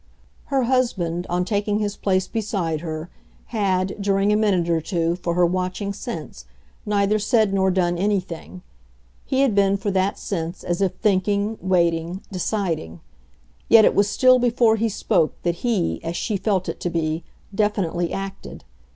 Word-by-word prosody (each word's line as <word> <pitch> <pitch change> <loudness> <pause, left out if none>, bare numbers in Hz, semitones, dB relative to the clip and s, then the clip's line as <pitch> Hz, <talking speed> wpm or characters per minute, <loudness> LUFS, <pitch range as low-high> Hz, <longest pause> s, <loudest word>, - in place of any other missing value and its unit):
Her 270 -2 +1
husband, 190 -9 0
on 180 +1 0
taking 205 0 0
his 205 -1 -2
place 185 -1 0
beside 195 -9 -2
her, 160 0 -5 0.4
had, 195 -2 0
during 200 +1 +2
a - - +3
minute 200 -5 +2
or 165 -1 +1
two, 170 0 -1
for 175 -1 -2
her 180 0 +4
watching 185 +3 -2
sense, 190 - -7 0.4
neither 205 +1 +2
said 215 -1 +2
nor 190 -1 +2
done 175 -2 +1
anything; 185 -2 -2 0.6
he 265 0 +1
had 270 -5 +3
been, 200 0 +3
for 200 +1 -2
that 190 +1 0
sense, 170 -2 -4
as 175 +2 -2
if 190 -2 +1
thinking, 205 +1 +1
waiting, 170 0 0
deciding: 180 - -2 0.7
yet 220 -2 +8
it - - +4
was 200 0 +3
still 255 +3 +5
before 235 -2 +3
he 225 +1 0
spoke 165 -5 0
that 170 -1 0
he, 215 -5 -1
as 165 +1 -3
she 215 - -2
felt 195 -1 0
it - - -4
to 175 - -2
be, 160 -1 -2 0.3
definitely 195 -5 0
acted. 195 0 -6
195 Hz, 160 wpm, -22 LUFS, 175-210 Hz, 0.7 s, yet